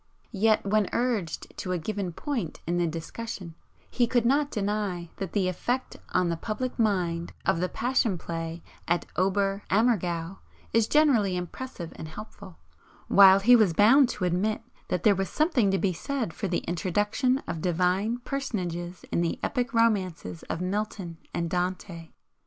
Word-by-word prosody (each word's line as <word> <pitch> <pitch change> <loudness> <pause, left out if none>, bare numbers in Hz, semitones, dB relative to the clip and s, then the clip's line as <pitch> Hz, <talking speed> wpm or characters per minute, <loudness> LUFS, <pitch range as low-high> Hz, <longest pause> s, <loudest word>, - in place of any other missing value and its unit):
Yet, 215 +1 +3
when 205 0 +2
urged 230 -8 -1
to 185 - -2
a - - 0
given 195 +1 -3
point 230 - -4
in 175 +1 0
the 175 -1 +2
discussion, 170 +2 -6 0.3
he 240 -2 +1
could 240 -1 +2
not 285 +4 +3
deny 200 - -2
that 195 -3 -5
'the 195 -3 +1
effect 245 +8 -2
on 180 -1 +2
the 170 - 0
public 230 +9 -4
mind' 180 -6 0
of 165 - +2
the 180 +1 0
Passion 235 -5 +1
Play 165 0 -5 0.2
at 175 +1 +1
Ober 195 +1 +1
Ammergau 190 -5 +1 0.3
is 225 -1 +3
generally 240 -12 +3
impressive 180 0 -6
and 155 - -6
helpful, 200 0 -10 0.5
while 195 0 +8
he 245 +5 +7
was 215 -7 +4
bound 240 - +6
to 205 -5 -2
admit 200 +6 0 0.2
that 180 -1 -2
there 210 - +6
was 195 -1 -2
something 300 - +2
to 195 - +2
be 190 -1 +1
said 230 - -3
for 200 - -3
the 175 - -2
introduction 205 - +1
of 165 -2 -4
Divine 185 +6 +1
personages 185 -10 -4
in - - +1
the 170 - -1
epic 250 +1 -1
romances 190 - 0
of 165 - -2
Milton 190 -3 -3
and 170 - -2
Dante. 180 -1 -3
195 Hz, 160 wpm, -27 LUFS, 175-225 Hz, 0.5 s, while